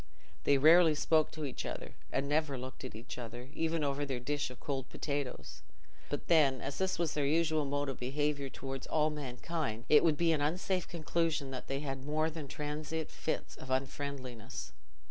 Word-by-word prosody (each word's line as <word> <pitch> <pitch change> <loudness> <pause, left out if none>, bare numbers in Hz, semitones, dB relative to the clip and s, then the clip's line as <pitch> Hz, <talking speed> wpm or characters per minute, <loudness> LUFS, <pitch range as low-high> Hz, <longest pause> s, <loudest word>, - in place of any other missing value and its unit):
They 140 - +6
rarely 160 +2 +7
spoke 155 +1 +3
to 155 -1 -3
each 135 - -4
other, - - -5 0.2
and 135 +1 0
never 150 -2 +1
looked 130 +2 -7
at 130 - -6
each 120 +3 -7
other, 120 +2 -7
even 165 -1 0
over 140 0 0
their 135 -3 -2
dish 145 +3 -1
of 125 - -11
cold 135 -2 -3
potatoes; 135 - -3 0.5
but 145 - -3
then, 145 -6 +5
as 135 +1 -4
this 190 0 +1
was 170 -3 0
their 145 -2 +1
usual 155 0 +3
mode 145 +1 0
of 135 - -4
behaviour 140 +2 0
towards 135 0 -6
all 155 0 +2
mankind, 140 -3 -3
it 150 - +8
would 155 -3 +4
be 170 0 +4
an 155 -3 +2
unsafe 180 +4 0
conclusion 165 -3 0
that 130 - -5
they 135 +1 -1
had 135 -2 -4
more 155 +3 +1
than 155 -3 -6
transient 150 +2 -3
fits - - -3
of 130 - -9
unfriendliness. 130 -3 -3
145 Hz, 185 wpm, -34 LUFS, 135-155 Hz, 0.5 s, it